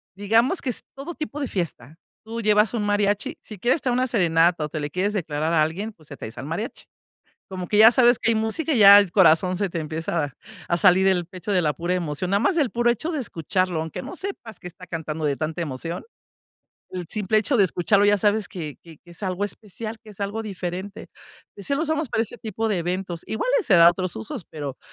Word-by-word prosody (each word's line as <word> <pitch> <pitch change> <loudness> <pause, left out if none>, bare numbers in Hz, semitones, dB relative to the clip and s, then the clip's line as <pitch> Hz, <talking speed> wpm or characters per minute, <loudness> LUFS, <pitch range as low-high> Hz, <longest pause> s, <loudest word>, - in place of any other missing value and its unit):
digamos 225 - +2
que 265 - -3
es 245 - -3
todo 290 +5 -7
tipo 300 -1 -5
de 275 - -2
fiesta. 155 - -4 0.3
Tú 225 +1 -5
llevas 210 0 +3
un 225 -3 -1
mariachi, 205 0 0
si 215 - -10
quieres 245 - +1
traer 250 - 0
una 255 +1 +1
serenata, 170 -6 +2
o - - -7
te 155 - -4
le 145 0 -3
quieres 185 +6 -1
declarar 160 -4 -2
a 155 -2 +4
alguien, 190 +8 -3
pues, 160 -8 -23
te 145 - -9
traes 110 -3 -9
al 125 - -6
mariachi. 170 - -5 0.6
Como 185 -2 -6
que 210 - +1
ya 220 +2 +9
sabes 240 -1 +5
que - - 0
hay - - +1
música, 220 +9 -1
y 245 - +2
ya 200 0 +10
el 200 -4 0
corazón 185 -1 +4
se 200 0 -1
te 170 - -3
empieza 155 -2 -3 0.3
a 170 - +1
salir 185 +1 +5
del 185 -2 +2
pecho 185 +3 -6
de 185 - +3
la 155 -3 +2
pura 170 +5 -2
emoción. 175 0 -2
Nada 200 - +3
más 345 +6 +2
el 285 -7 +2
puro 240 0 +2
hecho 310 +8 -3
de 310 - -2
escucharlo, 185 - -1
aunque 160 -2 -5
no 370 - -8
sepas 310 - -7
qué - - -8
está 180 +1 -12
cantando 160 -2 -5
de 140 -2 0
tanta 160 +2 -3
emoción, 165 +2 -5 0.9
el 180 -2 -5
simple 215 0 +1
hecho 235 +5 0
de 205 - +6
escucharlo 185 +3 +2
ya 205 0 +4
sabes 210 +1 +1
que 160 -7 -7
que 165 -2 -14
que 175 - -21
es 170 +4 -12
algo 185 +1 -2
especial, 215 +2 -6
que 215 - -12
es 205 - -17
algo 205 +3 -2
diferente. 190 0 -6 0.5
Sí, 200 +7 -3
lo 280 - 0
usamos 315 -3 -1
para 225 - +1
ese 240 +2 -9
tipo 225 +1 -3
de 205 - +1
eventos. 175 0 -3
Igual 220 - -2
y - - -3
se 220 - +2
da 170 -1 +8
otros 180 0 -3
usos, 110 - -6
pero, 145 -4 -6
190 Hz, 235 wpm, -23 LUFS, 170-220 Hz, 0.9 s, ya